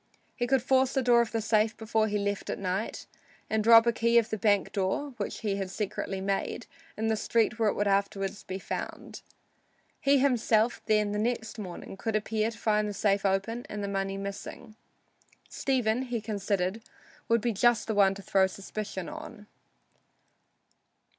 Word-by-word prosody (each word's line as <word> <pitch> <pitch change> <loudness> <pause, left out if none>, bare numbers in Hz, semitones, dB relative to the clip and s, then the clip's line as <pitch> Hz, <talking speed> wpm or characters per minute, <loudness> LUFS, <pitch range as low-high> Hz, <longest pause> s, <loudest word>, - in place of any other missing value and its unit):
He 245 - -1
could 260 -1 +2
force 260 0 +3
the 265 - +1
door 240 -1 +5
of 235 - -2
the 225 - -1
safe 215 0 +2
before 220 0 0
he 210 0 -1
left 200 0 -2
at - - -2
night, 190 +3 -3 0.5
and 220 -1 +1
drop 230 +1 +8
a 235 - +4
key 235 +1 +3
of 230 -1 +3
the 220 - -1
bank 205 -1 +2
door, 195 +9 -1
which 205 - -4
he 205 -3 -1
had 195 -1 -3
secretly 195 -1 -3
made, 195 +4 -2 0.3
in 220 - -2
the 220 0 +2
street 230 +2 +1
where 220 -2 +3
it - - -2
would 205 - 0
afterward 195 0 +1 0.2
be 190 - -3
found. 195 - -6 0.8
He 280 +1 +4
himself, 240 -4 +2
then, 210 -1 +2
next 220 +1 -2
morning, 190 -1 -7
could 220 +2 -2
appear 215 +1 0
to 230 - -10
find 210 -1 +1
the - - -4
safe 200 0 +2
open 195 +5 -1
and 210 -1 -4
the - - -2
money 195 0 -2
missing. 200 +3 -7 0.7
Stephen, 250 -3 0
he 245 -3 -3
considered, 200 -1 -2 0.5
would 230 0 +3
be 235 +1 0
just 240 +3 +3
the 220 - -2
one 195 -2 +4
to 200 - -10
throw 190 0 +3
suspicion 195 +1 -6
upon. 305 -9 -9
215 Hz, 180 wpm, -29 LUFS, 200-230 Hz, 0.8 s, drop